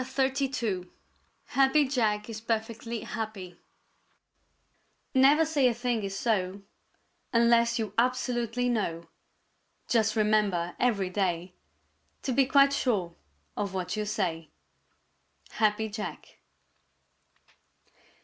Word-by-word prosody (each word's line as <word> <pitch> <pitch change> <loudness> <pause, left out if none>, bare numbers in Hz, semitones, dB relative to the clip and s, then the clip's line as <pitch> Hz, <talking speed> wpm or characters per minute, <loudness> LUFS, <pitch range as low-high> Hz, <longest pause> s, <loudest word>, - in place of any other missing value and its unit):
CHAPTER 265 +1 0 0.2
XXXII 215 -9 -2 0.6
HAPPY 275 +2 +3
JACK 215 -5 0
IS 220 -2 -7
PERFECTLY 230 0 -3
HAPPY 200 -6 -6 1.5
Never 285 +4 +5
say 295 -5 +2
a 240 - +1
thing 240 -1 -1
is 195 -1 -4
so 195 -3 -1 0.7
Unless 235 0 +4
you 215 -3 -3
absolutely 245 -1 0
know. 170 -8 -2 0.8
Just 220 -2 +2
remember 210 -5 +1
every 200 -7 +1
day 180 -2 -1 0.7
To 265 - -1
be 270 +1 +3
quite 275 0 +5
sure 200 -11 0 0.4
of 195 -2 -3
what 180 +1 -2
you 210 0 -2
say. 170 -7 -2 1.1
_Happy 215 -1 +1
Jack. 215 -1 -7
220 Hz, 100 wpm, -28 LUFS, 195-245 Hz, 1.5 s, Never